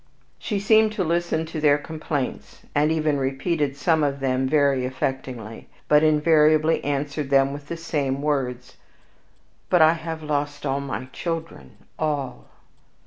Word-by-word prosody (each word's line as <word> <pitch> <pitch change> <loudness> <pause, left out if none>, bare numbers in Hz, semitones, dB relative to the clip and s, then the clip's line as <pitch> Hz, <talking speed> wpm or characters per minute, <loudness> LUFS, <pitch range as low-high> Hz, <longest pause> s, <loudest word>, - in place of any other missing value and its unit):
She 205 -3 -2
seemed 220 +1 +4
to 205 -3 -1
listen 170 -1 0
to 160 -1 -6
their 145 -1 +5
complaints, 150 -2 -5
and 150 +2 +2
even 155 -3 +1
repeated 140 +2 -1
some 160 +1 +2
of 140 -1 -1
them 130 -1 0
very 140 -3 +3
affectingly, 125 -3 -4 0.2
but 150 0 +5
invariably 155 0 +3
answered 145 0 -2
them 135 0 +3
with 145 0 -9
the 170 - -5
same 145 -5 -2
words, 125 -4 -2 0.9
"But 175 -3 +5
I 160 +1 +6
have 160 -1 -6
lost 145 -1 -2
all 135 +1 0
my 135 -2 -5
children 165 - -5 0.2
all!" 145 -5 -2
150 Hz, 140 wpm, -23 LUFS, 135-160 Hz, 0.9 s, I